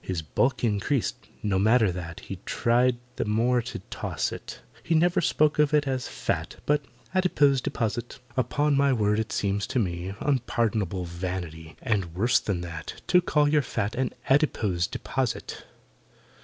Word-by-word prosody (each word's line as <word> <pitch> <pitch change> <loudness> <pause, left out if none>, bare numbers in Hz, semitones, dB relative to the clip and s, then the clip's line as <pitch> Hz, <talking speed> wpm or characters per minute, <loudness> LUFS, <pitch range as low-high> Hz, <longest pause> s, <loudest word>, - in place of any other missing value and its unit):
His 90 -4 -3
bulk 75 - 0
increased—no 105 -3 -1
matter 110 0 +4
that— 85 -2 -6
He 95 - -7
tried 120 +1 +2 0.2
the - - 0
more 120 +4 +2
to - - -6
toss - - -2
it— - - -8 0.2
He 165 - 0
never 175 +2 +3
spoke 150 -2 +2
of 150 0 +4
it 145 -1 +2
as 130 -2 -1
"fat," - - -3
But 150 0 +2 0.3
"adipose 145 -8 +3
deposit." 115 +1 -2 0.2
Upon 140 +4 +1
my 140 0 +4
word, 105 -2 +2
it 110 - -2
seems 100 0 0
to - - -2
me 90 -3 -1
Unpardonable 115 - 0
vanity 85 -3 -5
(And 95 -7 -1
worse 120 +7 +3
than 95 -4 -2
that) 85 -1 -7
To 180 - +6
call 150 -4 +2
your 150 0 +4
fat 105 -5 -2
An 130 -1 0 0.2
"adipose 110 - +2
deposit." 130 -3 -3
115 Hz, 155 wpm, -27 LUFS, 95-135 Hz, 0.3 s, To